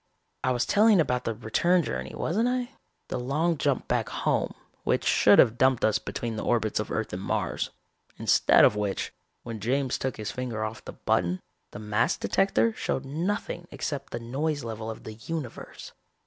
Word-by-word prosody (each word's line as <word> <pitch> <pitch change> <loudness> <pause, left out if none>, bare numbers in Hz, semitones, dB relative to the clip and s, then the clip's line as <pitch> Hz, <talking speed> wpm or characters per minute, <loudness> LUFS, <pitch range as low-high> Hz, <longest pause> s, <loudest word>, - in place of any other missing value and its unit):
"I 130 - +2
was 120 -1 +1
telling 210 -1 +5
about 125 -5 +1
the 115 - -1
return 170 +11 +2
journey, - - -4
wasn't 220 +8 0
I? 250 -1 -1 0.4
The - - -2
long 150 +7 +1
jump 140 -3 0
back - - 0
home, - - 0 0.3
which - - +1
should - - +6
have 115 +2 +5
dumped 130 -2 +4
us 110 0 +2
between 115 0 -4
the - - -3
orbits 110 -3 +1
of 105 - -3
Earth 110 -4 -2
and 90 - -3
Mars. - - -1 0.5
Instead - - +5
of - - +4
which, 105 -2 -2 0.3
when 115 -2 -6
James 130 +4 0
took 130 -1 -2
his 105 -2 -4
finger 120 -4 -3
off 110 +1 -6
the - - -7
button, 90 +1 0 0.3
the - - -9
mass 105 +1 +1
detector 195 +4 +2
showed 135 -9 -2
nothing 175 +4 -3
except 145 -3 -4
the 120 - -3
noise 140 +5 -2
level 110 -1 -5
of 110 - -7
the 110 - -7
universe. 130 +4 -7
125 Hz, 180 wpm, -27 LUFS, 110-160 Hz, 0.5 s, should